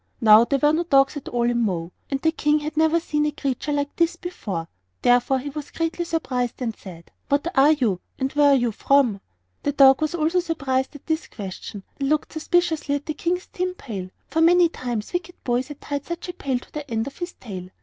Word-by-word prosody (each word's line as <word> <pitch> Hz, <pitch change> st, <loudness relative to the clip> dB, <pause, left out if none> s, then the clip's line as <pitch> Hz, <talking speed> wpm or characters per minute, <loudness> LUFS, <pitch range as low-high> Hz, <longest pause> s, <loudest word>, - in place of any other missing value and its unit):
Now 220 Hz, -1 st, +7 dB
there 275 Hz, -, +1 dB
were 295 Hz, +2 st, +3 dB
no 320 Hz, -, +2 dB
dogs 275 Hz, -3 st, +3 dB
at 290 Hz, -, -7 dB
all 240 Hz, -1 st, +1 dB
in 240 Hz, 0 st, +1 dB
Mo, 180 Hz, -6 st, -1 dB, 0.2 s
and 275 Hz, -, -1 dB
the 320 Hz, +3 st, +2 dB
King 300 Hz, -2 st, +2 dB
had 305 Hz, +1 st, -5 dB
never 320 Hz, +1 st, +3 dB
seen 300 Hz, -2 st, -1 dB
a -, -, 0 dB
creature 280 Hz, 0 st, -3 dB
like 285 Hz, 0 st, -1 dB
this 340 Hz, 0 st, +2 dB
before; 205 Hz, -, -5 dB, 0.4 s
therefore 245 Hz, +2 st, +4 dB
he 280 Hz, +2 st, -5 dB
was 295 Hz, 0 st, -6 dB
greatly 330 Hz, +1 st, -2 dB
surprised, 255 Hz, -8 st, -2 dB
and 230 Hz, -4 st, -2 dB
said: 170 Hz, -4 st, -12 dB, 0.2 s
"What 290 Hz, +5 st, 0 dB
are 280 Hz, +3 st, +6 dB
you, 225 Hz, -, 0 dB, 0.2 s
and 265 Hz, +1 st, -2 dB
where 290 Hz, -1 st, +5 dB
do 260 Hz, -, +2 dB
you 240 Hz, -1 st, +1 dB
come 275 Hz, +1 st, +3 dB
from?" -, -, -43 dB, 0.4 s
The 285 Hz, -, -1 dB
dog 270 Hz, 0 st, +6 dB
also 310 Hz, +1 st, -1 dB
was 350 Hz, +3 st, +2 dB
surprised 275 Hz, -5 st, -1 dB
at 290 Hz, -, -12 dB
this 320 Hz, 0 st, -1 dB
question, 195 Hz, 0 st, -8 dB, 0.2 s
and 275 Hz, -1 st, 0 dB
looked 305 Hz, 0 st, 0 dB
suspiciously 320 Hz, -2 st, +1 dB
at 285 Hz, -, -4 dB
the 310 Hz, -, -2 dB
King's 355 Hz, +4 st, -2 dB
tin 365 Hz, 0 st, -3 dB
pail; 195 Hz, -, -6 dB, 0.2 s
for 320 Hz, +4 st, 0 dB
many 345 Hz, +1 st, +6 dB
times 240 Hz, -6 st, -4 dB
wicked 355 Hz, 0 st, -3 dB
boys 245 Hz, +1 st, 0 dB
had 295 Hz, -1 st, -9 dB
tied 285 Hz, -1 st, -3 dB
such 340 Hz, +1 st, -5 dB
a -, -, -4 dB
pail 275 Hz, -7 st, -2 dB
to 245 Hz, -, -12 dB
the 300 Hz, -1 st, -6 dB
end 225 Hz, -1 st, -1 dB
of 280 Hz, -, -9 dB
his 350 Hz, 0 st, -4 dB
tail. 185 Hz, -6 st, -8 dB
285 Hz, 230 wpm, -23 LUFS, 245-320 Hz, 0.4 s, Now